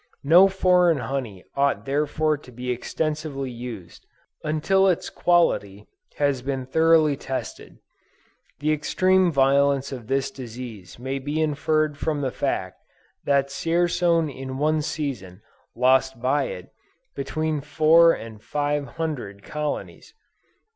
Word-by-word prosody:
No 170 +7 +7
foreign 180 -3 +3
honey 125 -8 -4
ought 140 0 +1
therefore 150 +2 0
to 145 -3 -14
be 125 +1 -4
extensively 145 +1 -3
used, 115 -8 -9 0.4
until 175 +6 +2
its 180 -3 0
quality 105 - +1 0.3
has 140 -3 0
been 135 0 -3
thoroughly 160 +1 +4
tested. 135 -1 -6 0.8
The 155 +1 +2
extreme 185 +4 +2
violence 140 0 +2
of 125 -5 -7
this 135 +1 0
disease 120 -7 -9
may 130 +3 -4
be 145 +3 -3
inferred 155 -1 0
from 155 -3 -1
the 130 -2 -1
fact, - - -3 0.4
that 140 -1 +2
Dzierzon 165 +1 +1
in 130 0 -6
one 155 +2 +1
season, 110 - -5 0.3
lost 130 +1 +2
by 135 +3 +1
it, 90 - -8 0.4
between 155 +2 -2
four 160 +3 +5
and 110 -7 -7
five 145 +1 -2
hundred 125 -12 -4
colonies! 150 - -5
140 Hz, 120 wpm, -24 LUFS, 130-155 Hz, 0.8 s, No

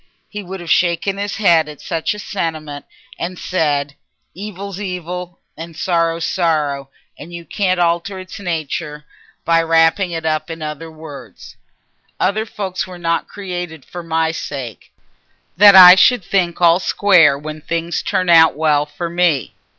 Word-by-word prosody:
He 210 - -7
would 190 0 -8
have 170 - -5
shaken 175 +3 +1
his 205 0 -3
head 165 -7 +3
at 150 - -11
such 165 +4 -3
a - - -9
sentiment 160 -8 -5 0.3
and 180 +1 -4
said, 145 -5 -1 0.4
"Evil's 200 0 -7
evil, 180 -2 -6 0.2
and 165 0 -10
sorrow's 165 -2 0
sorrow, 150 -6 -1 0.3
and 160 +4 -10
you 170 -1 -9
can't 185 -2 -1
alter 170 +3 0
it's 185 +3 -9
natur 155 -4 -4 0.4
by 165 0 +3
wrapping 165 +3 +2
it 165 -2 -5
up 155 0 -1
in 165 -1 -7
other 150 +1 -6
words. 155 -4 -12 0.6
Other 215 +4 0
folks 190 -3 -4
were 180 -1 -10
not 170 -1 -1
created 175 -7 -7
for 175 - -8
my 160 -1 -1
sake, 135 - -7 0.6
that 200 +1 +8
I 180 -1 +11
should 240 +3 +4
think 175 -2 -1
all 170 0 +4
square 180 -7 +4
when 155 +1 -8
things 170 +2 -3
turn 185 - -1
out 165 -3 +6
well 150 -1 +1
for 170 +3 -5
me." 170 -5 0
170 Hz, 155 wpm, -17 LUFS, 160-185 Hz, 0.6 s, I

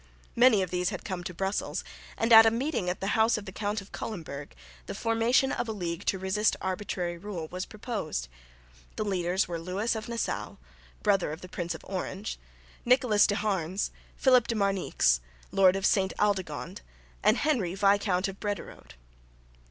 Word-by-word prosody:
Many 235 -5 +6
of 185 - -5
these 180 0 0
had 190 -4 -6
come 180 -2 -4
to - - -3
Brussels, 190 +3 -2 0.3
and 230 +1 +3
at 225 0 +10
a - - +7
meeting 230 - -1
at 180 - -3
the 195 - -1
house 225 +1 +3
of 210 - -7
the 190 - -7
Count 205 +2 -2
of 195 - -15
Culemburg 155 -8 -6 0.3
the - - -5
formation 230 +4 +2
of 235 - -2
a - - -1
league 175 -2 -4
to 195 - +1
resist 190 +3 +1
arbitrary 185 -2 -3
rule 180 -4 -5
was 185 +1 -4
proposed. 205 - -4 0.7
The 215 - -2
leaders 185 -1 0
were 170 -1 -4
Lewis 190 +7 -1
of 220 +1 -5
Nassau, 235 -1 -3 0.5
brother 195 -6 +2
of 160 - -7
the 185 - -10
Prince 175 -2 -3
of - - -11
Orange, 190 +2 -4 0.4
Nicolas 245 -4 +4
de 205 - 0
Harnes, 190 -3 -1 0.3
Philip 255 -3 +5
de 230 - -1
Marnix, 195 - +2 0.3
lord 190 -1 +5
of 195 - -1
Sainte 190 -2 +2
Aldegonde, 195 - -1 0.4
and - - +4
Henry, 230 - 0
Viscount 195 -1 +2
of 195 0 -7
Brederode. 205 - -5
195 Hz, 175 wpm, -28 LUFS, 180-220 Hz, 0.7 s, at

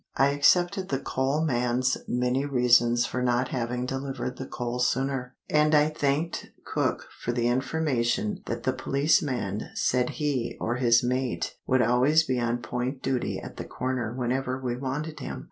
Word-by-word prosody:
I 135 - +4
accepted 175 +6 +3
the 135 - +1
coal 135 +3 -1
man's 125 -1 +1
many 125 +2 0
reasons 120 -3 +4
for 125 - -3
not 125 +1 +1
having 125 0 -2
delivered 135 -1 -4
the 130 - -6
coal 120 0 -4
sooner; 130 0 0
and 150 0 +3
I 150 +1 +5
thanked 150 +2 -1 0.2
cook - - -1
for 120 - -2
the 120 -1 0
information 145 - 0
that - - -3
the 130 - +1
policeman 130 - 0
said 125 -1 +1
he 140 -6 -1
or 120 +2 -1
his 120 -2 +4
mate 125 0 -1
would 130 -1 +3
always 130 +7 +4
be 130 -4 -1
on 120 0 -1
point 125 +4 -3
duty 130 -2 -1
at - - -10
the - - -5
corner 125 -3 -3
whenever 130 +1 -1
we 125 -2 -2
wanted 140 +5 -4
him. - - -5
130 Hz, 160 wpm, -27 LUFS, 120-140 Hz, 0.2 s, I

